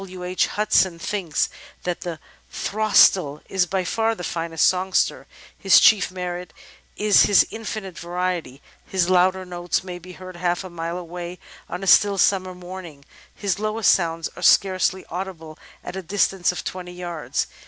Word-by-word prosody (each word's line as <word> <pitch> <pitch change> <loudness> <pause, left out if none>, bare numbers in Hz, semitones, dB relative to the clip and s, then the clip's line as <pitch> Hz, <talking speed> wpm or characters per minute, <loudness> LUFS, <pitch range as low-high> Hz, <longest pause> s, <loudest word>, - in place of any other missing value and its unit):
W. 185 -2 -9
H. 180 +1 +1
Hudson 200 -4 +2
thinks 170 -3 -1 0.4
that 180 -1 -3
"The 170 -2 -5 0.3
Throstle 195 -7 +3
is 190 -2 +1
by 190 +1 -1
far 225 +4 0
the 180 - -8
finest 165 -1 0
songster. 185 +1 0 0.3
His 195 -5 +6
chief 215 -3 +5
merit 180 -1 -6 0.4
is 210 -1 +5
his 205 - +5
infinite 215 -4 -6
variety. 175 -6 -3 0.2
His 185 -1 0
louder 185 +1 +3
notes 175 -1 -2
may 180 -1 -7
be 180 +1 -12
heard 185 -1 -10
half 175 +1 -1
a 185 - -9
mile 170 0 -4
away 175 0 -7 0.3
on 180 +2 -5
a - - -3
still 200 +1 +5
summer 185 -1 +2
morning, 175 -5 -10 0.3
his 200 -2 -2
lowest 215 -1 +2
sounds 165 -2 -1
are - - -10
scarcely 185 0 +3
audible 170 -3 -6 0.2
at - - -7
a 190 - -4
distance 190 0 +1
of 180 - -6
twenty 180 -1 -6
yards. 175 -3 -3
180 Hz, 160 wpm, -23 LUFS, 175-190 Hz, 0.4 s, His